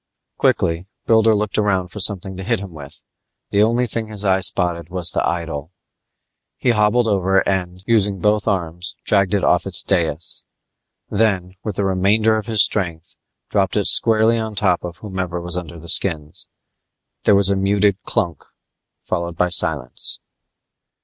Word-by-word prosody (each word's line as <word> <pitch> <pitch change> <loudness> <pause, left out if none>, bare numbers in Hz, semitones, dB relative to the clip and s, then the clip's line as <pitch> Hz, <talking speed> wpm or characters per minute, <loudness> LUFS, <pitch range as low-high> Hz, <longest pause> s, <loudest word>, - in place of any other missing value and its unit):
Quickly 85 +3 +1 0.2
Builder 110 -1 +4
looked 105 0 -1
around 95 -4 0
for 105 - -9
something 95 -1 0
to 95 - -7
hit - - 0
him 100 -2 -8
with. 70 -3 -11 0.5
The 100 - +3
only 115 +3 +2
thing 115 -1 -2
his 105 -1 -7
eye 95 -1 +3
spotted 85 -3 0
was 90 -2 -1
the - - -1
idol. 80 -2 -5 0.8
He 125 - +1
hobbled 115 +2 +2
over 95 -2 +1
and, 90 -1 -2
using 105 -4 +1
both 105 +2 +1
arms, 90 -3 -2
dragged 100 -1 +2
it 100 - -1
off - - +2
its - - +3
dias. 85 -3 -1 0.6
Then, 100 -4 0
with 105 -3 -4
the 100 - -1
remainder 100 +4 +2
of 110 0 -4
his 110 -3 +4
strength, 85 -5 -3 0.4
dropped - - +1
it - - 0
squarely 115 +1 +3
on 110 -1 -5
top 95 -3 +1
of 85 0 -7
whomever 95 -4 -4
was 90 0 +1
under 85 -2 -5
the 85 +1 -12
skins. 80 -4 +2 0.8
There 105 - +5
was 100 -1 +3
a 100 - +2
muted 100 0 +1
clunk 85 - -1 0.6
followed 85 -1 -3
by 90 - +1
silence. 80 -4 -1
95 Hz, 165 wpm, -19 LUFS, 90-105 Hz, 0.8 s, There